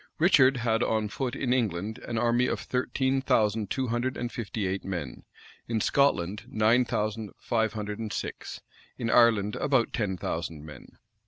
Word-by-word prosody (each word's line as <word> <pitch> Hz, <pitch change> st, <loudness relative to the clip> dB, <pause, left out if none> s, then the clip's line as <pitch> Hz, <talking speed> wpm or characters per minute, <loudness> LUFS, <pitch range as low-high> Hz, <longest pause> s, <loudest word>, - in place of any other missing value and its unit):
Richard 135 Hz, -6 st, +5 dB
had 115 Hz, -1 st, +1 dB
on 110 Hz, -2 st, 0 dB
foot 125 Hz, +3 st, -3 dB
in 125 Hz, -2 st, 0 dB
England 110 Hz, -3 st, -1 dB
an 115 Hz, -, -5 dB
army 120 Hz, +2 st, +2 dB
of -, -, -1 dB
thirteen 130 Hz, +1 st, 0 dB
thousand 105 Hz, -4 st, +1 dB
two 130 Hz, -2 st, -1 dB
hundred 120 Hz, +2 st, -1 dB
and 120 Hz, -1 st, -3 dB
fifty 110 Hz, -2 st, -4 dB
eight 95 Hz, +1 st, -2 dB
men, 85 Hz, -10 st, -5 dB, 0.4 s
in 115 Hz, -1 st, 0 dB
Scotland 105 Hz, -7 st, +1 dB
nine 115 Hz, +3 st, +3 dB
thousand 105 Hz, -1 st, -2 dB
five 110 Hz, -1 st, 0 dB
hundred 105 Hz, -1 st, -5 dB
and 110 Hz, -2 st, -4 dB
six, -, -, -5 dB, 0.4 s
in 115 Hz, -2 st, -2 dB
Ireland 110 Hz, -4 st, +4 dB
about 135 Hz, -5 st, +1 dB
ten 100 Hz, -4 st, -1 dB
thousand 80 Hz, -3 st, -4 dB
men. 75 Hz, -, -13 dB
115 Hz, 165 wpm, -28 LUFS, 105-125 Hz, 0.4 s, Richard